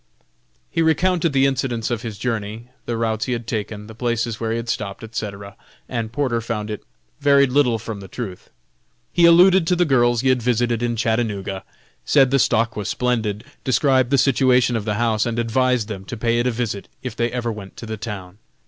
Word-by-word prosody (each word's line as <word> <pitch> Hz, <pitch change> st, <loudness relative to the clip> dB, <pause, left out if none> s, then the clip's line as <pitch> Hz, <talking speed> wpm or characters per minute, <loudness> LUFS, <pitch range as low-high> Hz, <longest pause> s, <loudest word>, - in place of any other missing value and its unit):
He -, -, 0 dB
recounted 170 Hz, +1 st, +2 dB
the 135 Hz, -1 st, +3 dB
incidents 125 Hz, -4 st, -1 dB
of 115 Hz, -2 st, -1 dB
his 115 Hz, -4 st, -6 dB
journey, 115 Hz, 0 st, -4 dB, 0.2 s
the 120 Hz, -, -1 dB
routes 110 Hz, 0 st, -1 dB
he 125 Hz, -, -1 dB
had 120 Hz, -1 st, -4 dB
taken, 105 Hz, -2 st, -4 dB
the 110 Hz, -, -11 dB
places 115 Hz, -1 st, -2 dB
where 115 Hz, -, -2 dB
he 115 Hz, -, 0 dB
had 115 Hz, 0 st, -5 dB
stopped, 100 Hz, -2 st, -3 dB
etc., 100 Hz, -3 st, -6 dB, 0.3 s
and 115 Hz, -2 st, -3 dB
Porter 120 Hz, -3 st, 0 dB
found 110 Hz, -2 st, -4 dB
it 105 Hz, -, -6 dB, 0.4 s
varied 140 Hz, -2 st, +4 dB
little 125 Hz, -4 st, +3 dB
from 115 Hz, -2 st, -6 dB
the 95 Hz, -, -9 dB
truth. 95 Hz, -3 st, -7 dB, 0.6 s
He 175 Hz, -, +5 dB
alluded 180 Hz, +1 st, +6 dB
to 180 Hz, -, +3 dB
the 175 Hz, 0 st, +2 dB
girls 120 Hz, -5 st, +3 dB
he 130 Hz, -, +2 dB
had 130 Hz, -1 st, +3 dB
visited 120 Hz, -1 st, +1 dB
in 120 Hz, -1 st, 0 dB
Chattanooga, 110 Hz, -4 st, -1 dB, 0.4 s
said 135 Hz, -3 st, +4 dB
the 135 Hz, -, +3 dB
stock 115 Hz, -2 st, +2 dB
was 105 Hz, -1 st, -3 dB
splendid, 110 Hz, -4 st, -1 dB, 0.2 s
described 130 Hz, -1 st, +3 dB
the 140 Hz, -, +3 dB
situation 125 Hz, -2 st, +3 dB
of 110 Hz, -2 st, -2 dB
the 105 Hz, -1 st, -1 dB
house 115 Hz, 0 st, +1 dB
and 115 Hz, -1 st, -2 dB
advised 120 Hz, 0 st, +1 dB
them 100 Hz, -4 st, -6 dB
to 120 Hz, -, -6 dB
pay 115 Hz, +1 st, +1 dB
it 120 Hz, -, +1 dB
a -, -, +2 dB
visit 110 Hz, -4 st, -3 dB, 0.2 s
if 130 Hz, -3 st, -5 dB
they 120 Hz, 0 st, 0 dB
ever 120 Hz, -2 st, -2 dB
went 100 Hz, -3 st, -9 dB
to -, -, -7 dB
the 110 Hz, 0 st, -4 dB
town. 100 Hz, -3 st, -7 dB
115 Hz, 205 wpm, -21 LUFS, 110-130 Hz, 0.6 s, alluded